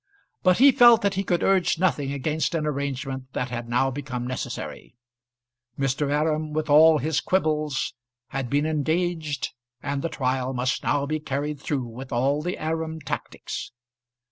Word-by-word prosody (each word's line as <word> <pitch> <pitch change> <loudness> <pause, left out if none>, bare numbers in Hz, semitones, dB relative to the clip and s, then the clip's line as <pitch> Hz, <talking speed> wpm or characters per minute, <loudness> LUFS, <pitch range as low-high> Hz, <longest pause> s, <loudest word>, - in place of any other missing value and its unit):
But 185 -1 +4
he 275 +3 +8
felt 240 -3 +7
that 200 -1 +2
he 195 +1 -1
could 175 -2 0
urge 190 -3 +3
nothing 155 -6 +1
against 155 +4 -1
an 155 -2 0
arrangement 135 -2 -3
that 125 0 -2
had 120 -1 -5
now 130 +3 +2
become 130 -3 -4
necessary. 125 0 -5 0.8
Mr. 135 +1 0
Aram, 155 +1 0
with 155 0 -1
all 155 +2 +7
his 150 +1 0
quibbles, 155 -6 0 0.4
had 135 -1 -3
been 145 +3 +1
engaged, 160 0 -1 0.3
and 140 -1 -2
the 165 - -2
trial 130 -2 -1
must 125 0 0
now 145 -1 +1
be 155 +2 -2
carried 145 0 -3
through 140 -3 -2
with 125 +3 -9
all 135 +5 +1
the 180 +3 -3
Aram 160 0 -3
tactics. 145 0 -5
150 Hz, 160 wpm, -25 LUFS, 135-160 Hz, 0.8 s, he